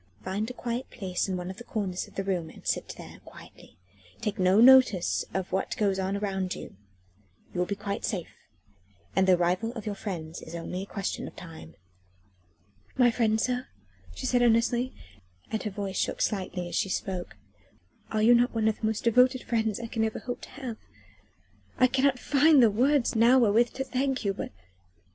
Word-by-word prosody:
Find 205 Hz, +4 st, -2 dB
a -, -, -6 dB
quiet 245 Hz, +1 st, -4 dB
place 190 Hz, -2 st, -3 dB
in 185 Hz, -, -1 dB
one 180 Hz, +1 st, -5 dB
of 190 Hz, -, -11 dB
the 240 Hz, -, -9 dB
corners 195 Hz, -6 st, -3 dB
of -, -, -19 dB
the 195 Hz, -, -2 dB
room 180 Hz, -4 st, -2 dB
and -, -, -15 dB
sit -, -, -2 dB
there -, -, -11 dB
quietly, -, -, -15 dB, 0.4 s
taking 210 Hz, -4 st, -1 dB
no 190 Hz, +3 st, +5 dB
notice 250 Hz, -7 st, +6 dB
of 190 Hz, 0 st, -3 dB
what 190 Hz, -, -1 dB
goes 195 Hz, -2 st, +1 dB
on 190 Hz, +1 st, -1 dB
around 190 Hz, -2 st, -2 dB
you. -, -, -9 dB, 0.8 s
You 180 Hz, -, -3 dB
will 180 Hz, -, +1 dB
be 200 Hz, -, -2 dB
quite 200 Hz, 0 st, -4 dB
safe, 180 Hz, -6 st, -3 dB, 0.8 s
and 190 Hz, 0 st, +3 dB
the 185 Hz, -, +6 dB
arrival 180 Hz, +6 st, 0 dB
of 225 Hz, -4 st, -7 dB
your 210 Hz, -, -2 dB
friends 170 Hz, -6 st, -6 dB
is 165 Hz, -, -9 dB
only 180 Hz, +2 st, -4 dB
a -, -, -5 dB
question 200 Hz, -2 st, -4 dB
of -, -, -11 dB
time." 160 Hz, -, -11 dB, 1.2 s
"My 245 Hz, -2 st, +5 dB
friends, 220 Hz, -2 st, +1 dB
sir?" 250 Hz, 0 st, -1 dB, 0.5 s
she -, -, -6 dB
said 250 Hz, -1 st, +2 dB
earnestly, 240 Hz, +2 st, +2 dB, 0.6 s
and 220 Hz, -, -1 dB
her 215 Hz, -, -3 dB
voice 195 Hz, -1 st, -4 dB
shook -, -, -1 dB
slightly 185 Hz, -3 st, -2 dB
as -, -, -9 dB
she 195 Hz, -, 0 dB
spoke, 185 Hz, -2 st, -3 dB, 0.7 s
"are 215 Hz, -1 st, 0 dB
you 235 Hz, +2 st, +7 dB
not 240 Hz, 0 st, +3 dB
one 220 Hz, -1 st, +2 dB
of 220 Hz, -, 0 dB
the -, -, -3 dB
most 220 Hz, -1 st, -2 dB
devoted 250 Hz, +2 st, +4 dB
friends 220 Hz, -3 st, 0 dB
I 235 Hz, -, -5 dB
can 225 Hz, -1 st, -2 dB
ever 220 Hz, 0 st, -1 dB
hope 245 Hz, 0 st, -5 dB
to -, -, -10 dB
have? 255 Hz, -4 st, -7 dB, 1.0 s
I 255 Hz, -, +5 dB
cannot 265 Hz, +1 st, +2 dB
find 285 Hz, +1 st, +5 dB
the 225 Hz, -, +5 dB
words 260 Hz, +4 st, +2 dB
now 235 Hz, +3 st, +6 dB
wherewith 235 Hz, 0 st, +4 dB
to 265 Hz, -, -3 dB
thank 265 Hz, -2 st, -1 dB
you, 200 Hz, -, +1 dB
but...." 195 Hz, -, -6 dB
215 Hz, 195 wpm, -28 LUFS, 190-245 Hz, 1.2 s, you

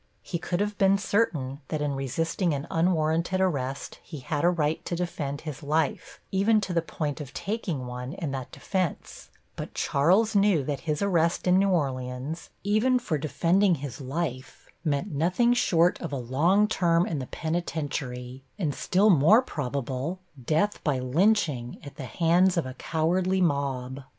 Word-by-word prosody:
He 170 Hz, -, -4 dB
could 175 Hz, +2 st, -2 dB
have 210 Hz, 0 st, -2 dB
been 195 Hz, 0 st, +5 dB
certain 155 Hz, -, 0 dB
that 155 Hz, -, -2 dB
in 145 Hz, -1 st, -1 dB
resisting 160 Hz, +5 st, -1 dB
an 140 Hz, +2 st, -4 dB
unwarranted 165 Hz, +1 st, +1 dB
arrest 140 Hz, -7 st, -2 dB
he 150 Hz, -5 st, -9 dB
had 150 Hz, +3 st, -2 dB
a 175 Hz, -, +6 dB
right 160 Hz, -3 st, 0 dB
to 175 Hz, -, -2 dB
defend 150 Hz, -5 st, -3 dB
his 155 Hz, -1 st, -7 dB
life, 150 Hz, +1 st, -1 dB
even 205 Hz, +3 st, +3 dB
to 190 Hz, -3 st, -3 dB
the 170 Hz, -, +2 dB
point 155 Hz, -2 st, -4 dB
of 140 Hz, -2 st, -9 dB
taking 185 Hz, -, -3 dB
one 125 Hz, +2 st, -6 dB
in 160 Hz, -6 st, -4 dB
that 130 Hz, -2 st, -5 dB
defense, 185 Hz, -5 st, -3 dB, 0.3 s
but -, -, -7 dB
Charles 190 Hz, +11 st, +2 dB
knew 200 Hz, -7 st, +4 dB
that 140 Hz, 0 st, -3 dB
his 150 Hz, +5 st, 0 dB
arrest 170 Hz, -4 st, +1 dB
in 180 Hz, +1 st, +5 dB
New 195 Hz, 0 st, +3 dB
Orleans, 135 Hz, -1 st, -2 dB
even 215 Hz, +6 st, +3 dB
for 175 Hz, -12 st, -2 dB
defending 175 Hz, +5 st, +2 dB
his 140 Hz, -1 st, -7 dB
life, 130 Hz, -3 st, -4 dB, 0.2 s
meant 155 Hz, +4 st, -1 dB
nothing 180 Hz, -, +2 dB
short 175 Hz, -7 st, +2 dB
of 170 Hz, -, -4 dB
a 140 Hz, -, -2 dB
long 160 Hz, -, +2 dB
term 175 Hz, -5 st, +2 dB
in 155 Hz, -, -2 dB
the 130 Hz, -, -5 dB
penitentiary, 135 Hz, -6 st, -4 dB
and 160 Hz, -8 st, -1 dB
still 195 Hz, +9 st, +3 dB
more 185 Hz, -, +6 dB
probable 140 Hz, -, -3 dB, 0.3 s
death 160 Hz, -, +1 dB
by 145 Hz, -4 st, +1 dB
lynching 135 Hz, -, +1 dB
at 140 Hz, -, -11 dB
the 135 Hz, -, -5 dB
hands 175 Hz, +5 st, +3 dB
of 170 Hz, -, +1 dB
a 130 Hz, -, -6 dB
cowardly 175 Hz, +6 st, 0 dB
mob. 140 Hz, -5 st, -1 dB
160 Hz, 165 wpm, -27 LUFS, 140-185 Hz, 0.3 s, a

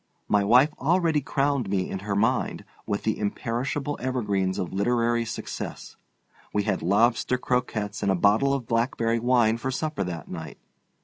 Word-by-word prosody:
My 105 Hz, -1 st, +3 dB
wife 125 Hz, +8 st, +5 dB
already 165 Hz, 0 st, +2 dB
crowned 140 Hz, -4 st, 0 dB
me 95 Hz, -2 st, 0 dB
in 95 Hz, -, -4 dB
her 100 Hz, +1 st, -3 dB
mind 115 Hz, +5 st, 0 dB, 0.2 s
with 100 Hz, -, -2 dB
the 110 Hz, -, -1 dB
imperishable 130 Hz, +7 st, -2 dB
evergreens 105 Hz, -7 st, -1 dB
of 90 Hz, -, -3 dB
literary 115 Hz, +3 st, +1 dB
success. 110 Hz, -, -6 dB, 0.6 s
We 105 Hz, -, 0 dB
had 105 Hz, -, -1 dB
lobster 115 Hz, +7 st, +2 dB
croquettes 110 Hz, -5 st, -2 dB
and 100 Hz, -2 st, +2 dB
a -, -, +2 dB
bottle 110 Hz, +9 st, +3 dB
of 130 Hz, -4 st, -4 dB
blackberry 115 Hz, 0 st, 0 dB
wine 120 Hz, -2 st, +3 dB
for 125 Hz, +3 st, -3 dB
supper 150 Hz, -2 st, -2 dB
that 85 Hz, -2 st, -6 dB
night. 80 Hz, -3 st, -7 dB
115 Hz, 160 wpm, -26 LUFS, 100-130 Hz, 0.6 s, wife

